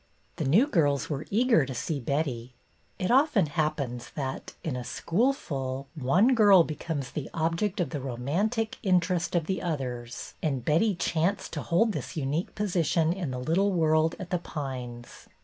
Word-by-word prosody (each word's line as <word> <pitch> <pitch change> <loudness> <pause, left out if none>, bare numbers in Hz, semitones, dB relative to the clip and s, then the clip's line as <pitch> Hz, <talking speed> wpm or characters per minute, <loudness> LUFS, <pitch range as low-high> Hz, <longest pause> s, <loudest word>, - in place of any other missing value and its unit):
The 160 - -2
new 185 - +5
girls 145 - +1
were 145 +1 -3
eager 230 - +4
to 130 -1 -5
see 150 +4 -2
Betty. 130 -3 -2 0.4
It 185 - -1
often 265 - +4
happens 145 -5 -2
that, 135 -3 -4
in 155 -6 -2
a 125 - -4
school 220 - +1
full, 135 - -5
one 175 - +3
girl 205 -6 +7
be 155 - -4
comes 150 -4 -4
the 150 - -5
object 165 +5 0
of 175 - -1
the 145 -4 -3
romantic 170 - -1
interest 180 -2 +1
of 170 -2 +1
the 190 +2 -2
others, 125 -7 -4
and 135 -6 -1
Betty 180 +7 +3
chanced 170 +3 -1
to 150 - -3
hold 215 +9 +2
this 190 - -5
unique 150 +4 -2
position 170 -5 +1
in 180 -6 -4
the 130 - -4
little 170 +10 +1
world 160 -2 +2
at 185 0 -7
The 180 - +1
Pines. 125 -7 -7
160 Hz, 170 wpm, -28 LUFS, 135-185 Hz, 0.4 s, girl